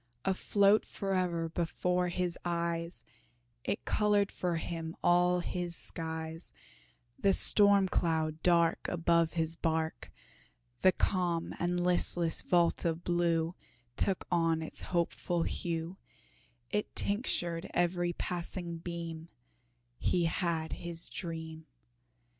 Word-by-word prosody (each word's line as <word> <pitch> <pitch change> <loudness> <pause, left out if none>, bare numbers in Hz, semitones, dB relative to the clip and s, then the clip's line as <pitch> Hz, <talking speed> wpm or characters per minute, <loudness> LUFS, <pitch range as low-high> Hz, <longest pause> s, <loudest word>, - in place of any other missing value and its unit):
Afloat 200 +2 +3
fore'er 180 -4 -1
before 180 +2 0
his 175 0 -1
eyes, 170 0 -2 0.6
It - - -3
colored 205 -1 +2
for 175 -2 -2
him 165 0 -4
all 180 0 +4
his 175 -1 -3
skies: 160 0 -5 0.6
The 195 -1 +4
storm 200 -1 +6
cloud 160 -3 0
dark 170 -2 +3
Above 170 -1 +2
his 165 -1 -1
bark, 160 -1 -2 0.7
The 185 - +6
calm 175 -3 0
and 175 0 0
listless 175 -2 +1
vault 175 -2 +2
of 165 0 -1
blue 170 -1 +1 0.4
Took 190 +5 0
on 165 -2 +2
its 160 - -4
hopeful 175 0 -1
hue, 170 +2 -3 0.7
It 210 - -2
tinctured 175 -6 0
every 175 0 +1
passing 175 0 -4
beam 165 -1 -6 0.7
He 175 -2 +1
had 165 -1 -1
his 170 -1 -2
dream. 160 -2 -6
170 Hz, 105 wpm, -32 LUFS, 165-180 Hz, 0.7 s, storm